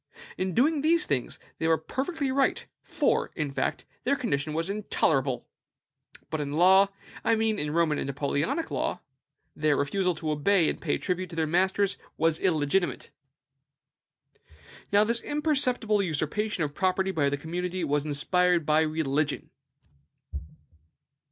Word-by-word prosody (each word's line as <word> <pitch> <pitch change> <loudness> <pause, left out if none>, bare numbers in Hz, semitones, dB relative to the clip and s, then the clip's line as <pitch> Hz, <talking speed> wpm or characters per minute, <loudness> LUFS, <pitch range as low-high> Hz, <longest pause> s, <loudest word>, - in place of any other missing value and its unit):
In 185 -2 -2
doing 290 +3 +3
these 325 +2 +3
things 130 -4 -2 0.2
they 160 - 0
were 165 0 +4
perfectly 275 - -3
right; 270 0 +1 0.2
for, - - 0
in 150 -4 -2
fact, - - -2 0.2
their 280 - +2
condition 155 - -2
was 165 +2 0
intolerable. 140 - 0 0.8
But 155 - -1
in 145 0 -4
law 190 +5 +6 0.4
I 230 - +3
mean 220 -1 0
in 150 - -2
Roman 155 -1 +1
and - - -3
Napoleonic 145 - -1
law - - -2 0.5
their 150 -1 +2
refusal 180 +5 0
to 155 -1 -3
obey 165 +3 +3
and - - -9
pay 155 - 0
tribute 180 -1 -2
to 165 - -9
their 160 -1 +1
masters 190 +4 +1 0.2
was 165 0 +2
illegitimate. 175 0 0 1.8
Now, 205 +1 +5
this 235 +2 -1
imperceptible 265 -8 +1
usurpation 175 +3 -1
of 145 -1 -3
property 190 +2 +1
by 145 -6 +1
the 145 - -1
commonalty 175 +4 -3
was 145 -1 0
inspired 170 +3 +1
by 155 +1 +4
religion. 155 -2 -1
170 Hz, 140 wpm, -27 LUFS, 150-205 Hz, 1.8 s, law